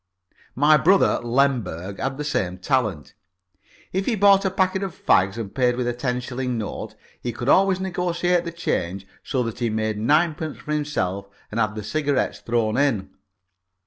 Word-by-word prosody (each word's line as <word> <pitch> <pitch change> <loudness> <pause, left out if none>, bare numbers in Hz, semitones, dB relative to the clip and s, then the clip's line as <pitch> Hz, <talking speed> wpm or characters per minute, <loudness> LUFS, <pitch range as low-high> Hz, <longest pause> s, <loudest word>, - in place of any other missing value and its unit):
My 150 +3 +5
brother 190 +6 +4
Lemberg 115 -8 0
had 135 0 -2
the 150 - -3
same 95 -11 -1
talent. 110 - -1 0.8
If 190 +1 -1
he 235 - +2
bought 200 -1 +5
a - - +3
packet 190 0 0
of 195 -4 -4
fags 95 +3 +2
and 110 -4 -5
paid 125 -2 +2
with 125 -1 -2
a 120 - 0
ten 125 0 -2
shilling 125 0 -3
note, 110 -2 -5 0.3
he 120 - -2
could 120 +2 -6
always 190 +4 +4
negotiate 180 -1 0
the 170 - -5
change 100 - -2 0.2
so 130 -2 -1
that 115 0 -5
he 120 -2 0
made 110 -1 -1
ninepence 155 +5 +1
for 150 - -8
himself 100 -11 -2 0.2
and 110 - -2
had 110 -1 +1
the 105 - -5
cigarettes 145 +4 -1
thrown 115 -1 0
in. 135 -9 +1
130 Hz, 175 wpm, -23 LUFS, 110-160 Hz, 0.8 s, My